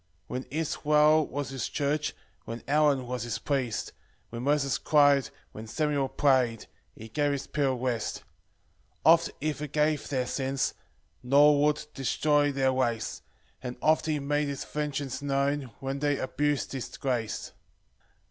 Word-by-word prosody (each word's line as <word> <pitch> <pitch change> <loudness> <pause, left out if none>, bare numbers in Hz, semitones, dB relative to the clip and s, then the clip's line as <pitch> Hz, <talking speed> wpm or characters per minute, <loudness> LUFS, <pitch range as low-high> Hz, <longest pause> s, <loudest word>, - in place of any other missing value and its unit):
2 - - -6
When 130 +1 -3
Israel 150 0 +3
was 145 -2 -4
his 135 -4 -3
church, 145 +1 -1 0.3
When 115 +1 -6
Aaron 145 -2 +3
was 125 0 -4
his 120 -1 -3
priest, 130 -6 -2 0.4
When 115 0 -5
Moses 140 0 +1
cry'd, 145 -2 +4 0.2
when 110 +1 -9
Samuel 145 +1 0
pray'd, 130 -6 +2 0.3
He 110 - -10
gave 145 +5 0
his 140 -1 -3
people 140 -4 0
rest. 120 -3 -2
3 - - -11 0.8
Oft 165 +1 +6
he 155 +1 0
forgave 150 0 -1
their 130 -3 0
sins, 135 +1 -1 0.5
Nor 145 +3 +5
would 150 0 +2
destroy 145 +2 +2
their 135 -1 +2
race; 120 -4 -1 0.4
And 125 -1 -6
oft 155 0 +2
he 155 -1 +1
made 145 +1 0
his 140 -2 -4
vengeance 145 -3 -3
known, 140 -1 0
When 135 +1 -3
they 145 -1 +1
abus'd 145 +2 -1
his 135 -3 -6
grace. 120 -5 -2
140 Hz, 150 wpm, -28 LUFS, 130-150 Hz, 0.8 s, Oft